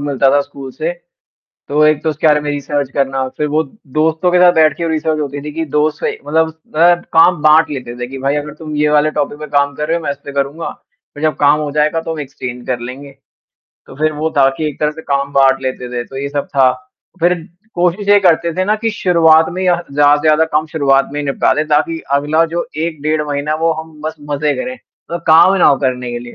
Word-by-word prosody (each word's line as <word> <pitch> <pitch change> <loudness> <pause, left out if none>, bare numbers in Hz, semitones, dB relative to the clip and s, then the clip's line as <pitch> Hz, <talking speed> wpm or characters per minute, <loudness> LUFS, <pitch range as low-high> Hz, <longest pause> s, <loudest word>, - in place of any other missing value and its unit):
मिलता 140 -2 +1
था 145 +1 +3
स्कूल 140 -2 -8
से, - - -3 0.8
तो 150 +2 +2
एक 155 -1 +2
तो 160 - +1
उसके 155 +1 0
बारे 150 -1 +4
में 150 - -4
रिसर्च 145 -1 -2
करना, 135 -1 -1
फिर 150 - 0
वो 155 +2 +1 0.3
दोस्तों 160 +3 +2
के 180 - +3
साथ 180 -1 +7
बैठ 155 -2 +3
के 170 - -4
वो 165 - -1
रिसर्च 155 0 -1
होती 145 -1 -4
थी 150 +1 -6
कि 165 0 -3
दोस्त 150 0 +1
से - - -1
मतलब 160 +2 +1 0.3
अ, 175 +2 +5 0.2
काम 165 0 +5
बाँट 155 +1 +5
लेते 125 -4 -6
थे 120 - -3
कि 135 +2 -8
भाई 140 +2 0
अगर 150 0 -4
तुम 155 -2 -6
ये 150 0 +2
वाले 150 +1 +3
टॉपिक 145 0 -2
पे 150 - -6
काम 140 0 +1
कर 150 +2 -3
रहे 165 - +1
हो 170 - -7
मैं 145 - -1
इस 140 - -6
पे 140 - -6
करूँगा, 140 +4 -2 0.4
फिर 145 - -8
जब 155 -2 +1
काम 145 +1 +4
हो 150 - -3
जाएगा 150 +2 +1
तो 165 - -4
हम 160 - -6
एक्सचेंज 125 -3 -7
कर 125 -2 -1
लेंगे। 135 +3 -9 0.7
तो - - -13
फिर 155 +1 0
वो 155 +2 -2
था 135 -1 +5
कि 155 - -2
एक 145 - -9
तरह 150 0 +1
से 160 - -11
काम 140 -1 -2
बाँट 135 -1 +3
लेते 130 -1 -4
थे 120 -1 -3
तो 135 - -12
ये 140 +1 -3
सब 145 0 -3
था। 130 -1 +5 0.5
फिर 175 +1 +3 0.4
कोशिश 180 +4 0
ये 205 0 +7
करते 170 -2 +2
थे 185 - 0
ना 210 +2 +2
कि 225 +1 -2
शुरुआत 165 -5 +4
में 185 +2 -4
यह 175 -1 +1
ज़्यादा 145 +1 +4
से 145 - -5
ज़्यादा 155 0 +4
कम 155 +1 +1
शुरुआत 140 -3 +1
में 145 - -3
निपटा 140 -1 +1
दें 155 +1 -1
ताकि 155 +2 +1
अगला 150 +3 +2
जो 170 - -2 0.2
1 160 -3 -5
डेढ़ 155 0 0
महीना 145 +1 -2
वो 165 - +3
हम 160 -1 -14
बस 155 +1 -4 0.2
मज़े 145 +1 0
करें 255 0 -4 0.3
अ, 170 - -2
काम 165 +4 +6
ना 180 - +5
वो 140 - +3
करने 125 -2 -2
के 120 - -3
लिए। 120 0 -11
150 Hz, 250 wpm, -15 LUFS, 140-160 Hz, 0.8 s, साथ